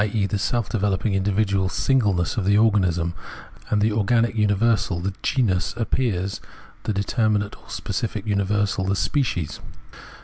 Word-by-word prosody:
e. 105 Hz, -3 st, +1 dB
the 100 Hz, 0 st, -2 dB
self 115 Hz, +2 st, 0 dB
developing 100 Hz, 0 st, 0 dB
individual 95 Hz, -1 st, +1 dB
singleness 100 Hz, -6 st, +1 dB
of 110 Hz, -, -1 dB
the 100 Hz, +2 st, +3 dB
organism, 90 Hz, -6 st, +2 dB, 0.6 s
and 105 Hz, -1 st, +2 dB
the 110 Hz, -, +3 dB
organic 115 Hz, +2 st, +2 dB
universal, 105 Hz, -3 st, +2 dB
the 95 Hz, +3 st, -3 dB
genus, 105 Hz, -10 st, 0 dB
appears 105 Hz, -5 st, -1 dB, 0.4 s
the -, -, 0 dB
de 100 Hz, 0 st, 0 dB
terminate 105 Hz, -2 st, 0 dB
or -, -, -20 dB
specific 110 Hz, -2 st, -3 dB
universal, 100 Hz, -1 st, 0 dB
the 95 Hz, +1 st, +1 dB
species. 90 Hz, -, -1 dB
100 Hz, 140 wpm, -23 LUFS, 95-110 Hz, 0.6 s, the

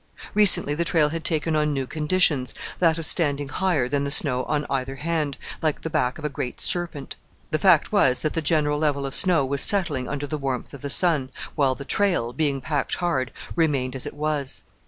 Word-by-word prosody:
Recently 205 Hz, -8 st, +6 dB
the 165 Hz, +3 st, -1 dB
trail 160 Hz, -3 st, +2 dB
had 165 Hz, +1 st, -5 dB
taken 160 Hz, 0 st, -1 dB
on 150 Hz, -1 st, 0 dB
new 135 Hz, -1 st, -2 dB
conditions, 150 Hz, -3 st, 0 dB, 0.2 s
that 165 Hz, -2 st, +2 dB
of 165 Hz, -, -3 dB
standing 145 Hz, -4 st, +2 dB
higher 160 Hz, -5 st, 0 dB
than 140 Hz, +2 st, -1 dB
the 140 Hz, -, -2 dB
snow 130 Hz, -3 st, +2 dB
on 150 Hz, -1 st, -2 dB
either 135 Hz, 0 st, -3 dB
hand, 150 Hz, -1 st, -3 dB, 0.2 s
like 155 Hz, -3 st, -2 dB
the 160 Hz, -, -5 dB
back 125 Hz, -2 st, -1 dB
of 155 Hz, -, -8 dB
a -, -, +2 dB
great 135 Hz, -3 st, -6 dB
serpent. 170 Hz, -6 st, -3 dB, 0.3 s
The 155 Hz, -, 0 dB
fact 175 Hz, -3 st, +3 dB
was 135 Hz, -12 st, +3 dB
that 155 Hz, -, -2 dB
the 165 Hz, -, -2 dB
general 150 Hz, -1 st, +1 dB
level 145 Hz, -2 st, -1 dB
of 135 Hz, -, -5 dB
snow 170 Hz, -7 st, +4 dB
was 140 Hz, 0 st, +1 dB
settling 155 Hz, -11 st, +2 dB
under 145 Hz, 0 st, -4 dB
the 150 Hz, +1 st, -5 dB
warmth 135 Hz, -2 st, -4 dB
of 140 Hz, -, -10 dB
the 140 Hz, -, -5 dB
sun, 150 Hz, -3 st, +3 dB, 0.2 s
while 135 Hz, -4 st, +1 dB
the 140 Hz, -, -9 dB
trail, 175 Hz, -, 0 dB
being 140 Hz, -3 st, -1 dB
packed 145 Hz, 0 st, -2 dB
hard, 135 Hz, -9 st, -2 dB, 0.2 s
remained 140 Hz, -6 st, 0 dB
as 130 Hz, -, -2 dB
it -, -, -8 dB
was. 150 Hz, -2 st, -3 dB
150 Hz, 210 wpm, -23 LUFS, 135-160 Hz, 0.3 s, Recently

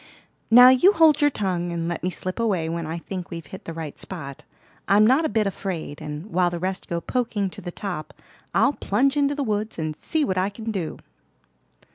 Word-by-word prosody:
Now 245 Hz, +2 st, +9 dB
you 305 Hz, +11 st, +6 dB
hold 315 Hz, -3 st, +5 dB
your 290 Hz, -, +5 dB
tongue, 180 Hz, -8 st, -2 dB
and 170 Hz, -1 st, -2 dB
let 170 Hz, -1 st, -3 dB
me 180 Hz, -, -1 dB
slip 185 Hz, +4 st, -5 dB
away 195 Hz, -8 st, 0 dB
when 165 Hz, 0 st, -3 dB
I 165 Hz, +2 st, -4 dB
think 180 Hz, +1 st, -6 dB
we've 165 Hz, -1 st, -7 dB
hit 190 Hz, -, -11 dB
the -, -, -5 dB
right 160 Hz, -3 st, -7 dB
spot. 140 Hz, -7 st, -6 dB, 0.5 s
I'm 205 Hz, +2 st, +5 dB
not 265 Hz, +8 st, +4 dB
a -, -, +1 dB
bit 220 Hz, -1 st, +1 dB
afraid, 180 Hz, -6 st, -4 dB
and 150 Hz, +3 st, -6 dB
while 180 Hz, 0 st, +2 dB
the 175 Hz, -, -4 dB
rest 185 Hz, +2 st, -3 dB
go 170 Hz, -, -2 dB
poking 210 Hz, -2 st, -2 dB
to -, -, -9 dB
the 175 Hz, -, -6 dB
top, 180 Hz, -5 st, -5 dB, 0.4 s
I'll -, -, +3 dB
plunge 270 Hz, +4 st, +1 dB
into 285 Hz, 0 st, +2 dB
the 285 Hz, -, -1 dB
woods 215 Hz, -2 st, -2 dB
and 155 Hz, -2 st, -3 dB
see 310 Hz, -, -1 dB
what 185 Hz, -6 st, 0 dB
I 190 Hz, +2 st, +1 dB
can 220 Hz, +2 st, -6 dB
do." 185 Hz, -7 st, -4 dB
190 Hz, 215 wpm, -24 LUFS, 170-230 Hz, 0.5 s, Now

